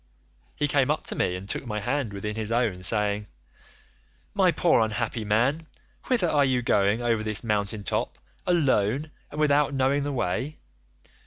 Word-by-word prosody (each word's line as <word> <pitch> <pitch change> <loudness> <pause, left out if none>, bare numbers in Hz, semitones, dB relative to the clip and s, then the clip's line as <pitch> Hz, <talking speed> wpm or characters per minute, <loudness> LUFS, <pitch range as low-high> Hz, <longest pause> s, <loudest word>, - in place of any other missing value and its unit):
He 145 - 0
came 140 -1 +2
up 150 - 0
to - - -2
me 90 - 0
and 95 +2 -7
took 125 - -4
my 105 -1 -2
hand 125 +2 -1
within 105 +2 -4
his 110 0 -2
own, 115 -6 0
saying, 105 +1 +1 1.1
'My - - +4
poor - - +3
unhappy 110 +1 -1
man, 125 +10 +1 0.4
whither 235 -9 +2
are 150 -3 +3
you 130 -2 +1
going 105 +1 +2
over 115 -2 +1
this 110 0 0
mountain 105 -2 -1
top, - - -2 0.3
alone 145 - +1 0.2
and 150 - -7
without 145 -1 +3
knowing 135 +2 +2
the 145 +1 -2
way? 130 +4 -2
120 Hz, 165 wpm, -26 LUFS, 105-145 Hz, 1.1 s, My